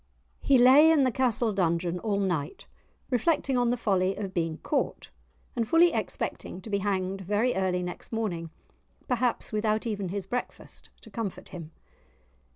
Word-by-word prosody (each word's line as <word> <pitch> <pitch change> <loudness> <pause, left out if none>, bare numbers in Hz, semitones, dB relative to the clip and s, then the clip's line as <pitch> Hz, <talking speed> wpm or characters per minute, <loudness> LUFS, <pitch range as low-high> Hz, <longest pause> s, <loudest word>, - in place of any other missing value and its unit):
He 275 - +4
lay 265 +6 +7
in 315 -4 +4
the 255 - +2
castle 235 -2 +1
dungeon 175 -1 0
all 205 -1 -1
night, 175 -7 -2 0.5
reflecting 270 +2 +1
on 245 -1 +2
the 245 - +1
folly 190 -4 +1
of 195 -2 -5
being 165 -2 -1
caught, 290 - -2 0.4
and 230 -2 -1
fully 335 +6 +5
expecting 180 - -4
to 215 - -9
be 200 - +1
hanged 195 -1 -2
very 210 +6 +1
early 185 -1 0
next 180 0 -7
morning, 190 -8 -3 0.6
perhaps 245 -2 -1
without 215 +1 0
even 205 -5 -3
his 195 0 -4
breakfast 245 +5 -6
to 220 - -14
comfort 200 -2 -5
him! 165 -3 -8
210 Hz, 160 wpm, -27 LUFS, 185-245 Hz, 0.6 s, lay